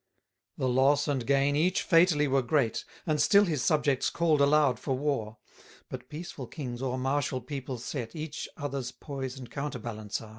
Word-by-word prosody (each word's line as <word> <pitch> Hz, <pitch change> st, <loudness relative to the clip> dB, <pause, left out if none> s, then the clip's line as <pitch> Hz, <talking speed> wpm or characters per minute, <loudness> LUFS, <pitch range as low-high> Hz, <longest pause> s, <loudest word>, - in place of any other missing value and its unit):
12 130 Hz, -, -1 dB
The -, -, +3 dB
loss 145 Hz, +2 st, +4 dB
and 135 Hz, -5 st, -1 dB
gain 140 Hz, +1 st, +3 dB
each 175 Hz, +5 st, +2 dB
fatally 165 Hz, -4 st, +4 dB
were 135 Hz, 0 st, +2 dB
great; 125 Hz, -2 st, 0 dB, 0.2 s
And 155 Hz, -2 st, +1 dB
still 205 Hz, 0 st, +6 dB
his 155 Hz, -7 st, -1 dB
subjects 145 Hz, -1 st, +2 dB
call'd 160 Hz, -4 st, +2 dB
aloud 140 Hz, -4 st, +4 dB
for 130 Hz, 0 st, -2 dB
war; 130 Hz, -7 st, -2 dB, 0.5 s
But 125 Hz, -1 st, -8 dB
peaceful 150 Hz, -4 st, -7 dB
kings, 125 Hz, -4 st, -6 dB
o'er 130 Hz, -1 st, -1 dB
martial 135 Hz, 0 st, 0 dB
people 130 Hz, 0 st, -5 dB
set, 120 Hz, 0 st, -5 dB
Each, 155 Hz, -1 st, -5 dB
other's 140 Hz, -4 st, -3 dB
poise 135 Hz, -2 st, -6 dB
and 125 Hz, -2 st, -10 dB
counterbalance 120 Hz, -7 st, -4 dB
are. 110 Hz, -, -11 dB
140 Hz, 175 wpm, -29 LUFS, 125-150 Hz, 0.5 s, still